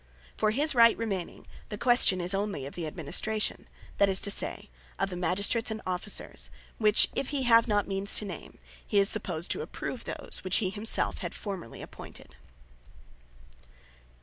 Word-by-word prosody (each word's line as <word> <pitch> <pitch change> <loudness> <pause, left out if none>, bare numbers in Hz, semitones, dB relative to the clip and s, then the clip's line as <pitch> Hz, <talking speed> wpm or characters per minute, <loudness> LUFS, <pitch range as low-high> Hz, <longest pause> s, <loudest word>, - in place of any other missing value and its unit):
For, 215 - +1
his 285 +8 +1
Right 230 -2 +6
remaining, 200 -6 -4 0.2
the 210 - -5
question 240 -6 +4
is 175 +2 -2
only 195 -8 -2
of 140 - -8
the 170 -3 -5
Administration; 185 +7 -3 0.3
that 200 - +5
is 190 - +2
to 200 - +2
say, - - +1 0.3
of 195 - -1
the - - -4
Magistrates 200 +6 +1
and 220 0 -4
Officers; 185 +3 -2 0.3
which, 215 -1 +5
if 270 - -2
he 280 -3 -1
have 230 -1 +5
not 205 -2 +1
means 195 0 +3
to 210 - +2
name, 200 - -9 0.3
he 210 - -2
is 200 0 +4
supposed 175 -6 0
to - - -1
approve - - -6
those, - - -2
which 185 0 0
he 190 -4 -1
himself 215 +2 +1
had - - -6
formerly 190 - -7
appointed. - - -12
200 Hz, 170 wpm, -28 LUFS, 185-220 Hz, 0.3 s, Right